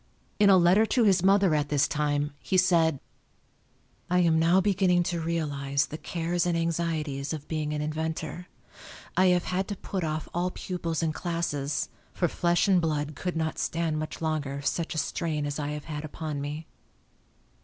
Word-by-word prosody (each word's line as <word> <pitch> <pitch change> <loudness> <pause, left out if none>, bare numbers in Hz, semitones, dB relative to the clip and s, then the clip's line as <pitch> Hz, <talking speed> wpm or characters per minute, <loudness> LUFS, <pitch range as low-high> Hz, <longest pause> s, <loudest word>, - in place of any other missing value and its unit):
In 205 -1 +6
a 190 - +8
letter 185 +5 +5
to 245 - +2
his 195 -4 +4
mother 195 -2 +4
at 150 -1 0
this 145 -2 +3
time, 145 0 0
he 190 - 0
said: 165 -5 +3 1.1
I 180 - +2
am 165 -2 +3
now 170 +3 +4
beginning 185 -3 +3
to 170 -1 -2
realize 145 -4 -1
the 155 - -7
cares 170 +1 -1
and 170 -1 +1
anxieties 160 -4 -1
of 150 -2 -6
being 155 -2 -2
an 150 0 -2
inventor. 160 +2 -4 0.7
I 185 - +5
have 180 -1 +3
had 185 +1 -1
to 205 - -3
put 190 -1 -4
off 155 -1 -2
all 175 +1 0
pupils 170 -3 -3
and 160 -1 0
classes, 165 -5 -2 0.2
for 175 - +1
flesh 175 +4 +1
and 185 -3 +4
blood 150 -2 -1
could 180 +3 -3
not 160 -1 -2
stand 165 -2 -1
much 155 +1 -5
longer 145 -3 -2
such 165 +3 -1
a - - -3
strain 155 -1 -1
as 145 +1 -3
I 145 - -2
have 150 0 -5
had 150 -2 -5
upon 155 -1 -5
me. 150 +3 -5
160 Hz, 180 wpm, -27 LUFS, 150-175 Hz, 1.1 s, a